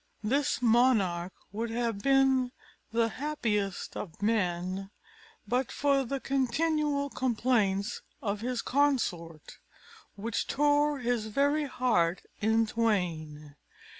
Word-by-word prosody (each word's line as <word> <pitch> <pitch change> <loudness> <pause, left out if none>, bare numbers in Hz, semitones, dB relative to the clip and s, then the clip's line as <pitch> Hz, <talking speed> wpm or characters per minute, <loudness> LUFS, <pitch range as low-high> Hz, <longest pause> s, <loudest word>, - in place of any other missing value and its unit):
This 260 +3 0
monarch 220 -7 +3 0.2
would 225 +3 -3
have 230 -2 -1
been 270 0 +3 0.4
the 230 0 +2
happiest 220 -9 -2
of 170 -6 -7
men, 190 -2 -1 0.6
but 250 0 0
for 280 -1 +2
the 270 +2 -3
continual 280 +2 0
complaints 225 -4 0 0.2
of 205 -1 -3
his 245 0 -2
consort, 200 - -1 0.6
which 220 +3 -2
tore 290 +1 +2
his 240 -3 -1
very 285 +6 +1
heart 220 -10 +1 0.2
in 225 +1 +3
twain. 165 -10 -2
230 Hz, 105 wpm, -29 LUFS, 200-270 Hz, 0.6 s, monarch